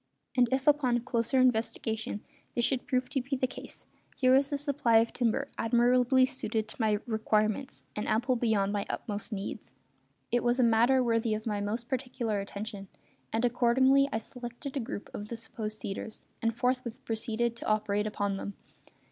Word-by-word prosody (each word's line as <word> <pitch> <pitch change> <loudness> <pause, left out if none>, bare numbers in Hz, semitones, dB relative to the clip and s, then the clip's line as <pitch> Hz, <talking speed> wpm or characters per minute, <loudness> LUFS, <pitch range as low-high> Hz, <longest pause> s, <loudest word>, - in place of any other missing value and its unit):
And 245 -2 +4
if 265 0 +1
upon 260 -5 +3
closer 240 +1 +1
investigation 225 -3 0 0.3
this 240 - +3
should 260 -1 0
prove 255 0 +1
to 275 -3 0
be 270 +2 -2
the 255 - +1
case, 255 - -9 0.3
here 255 0 +5
was 275 +1 +3
a 285 - +1
supply 280 -5 +2
of 225 +1 +3
timber 245 +3 0
admirably 245 +2 +4
suited 225 -5 -2
to - - -6
my 215 -1 +3
requirements 220 +2 0
and 210 - -3
ample 240 +4 +2
beyond 215 -4 +1
my 200 -1 -2
utmost 210 +1 -4
needs. 205 0 -6 0.6
It 240 0 +2
was 240 +1 +2
a - - +5
matter 235 +3 +4
worthy 230 -2 +1
of 215 - -6
my 210 -2 -1
most 225 +4 -3
particular 245 -5 -2
attention; 200 0 -6 0.4
and 225 +2 +1
accordingly 260 +3 +4
I - - 0
selected 240 +4 -7
a - - 0
group 230 -4 -6
of 210 +1 -6
the 235 - -4
supposed 215 -2 -6
cedars, 215 +2 -6 0.2
and 230 0 0
forthwith 250 -1 -1
proceeded 230 +1 -1
to - - -6
operate 210 -1 +1
upon 205 -2 -1
them. 200 - -5
235 Hz, 175 wpm, -30 LUFS, 215-255 Hz, 0.6 s, here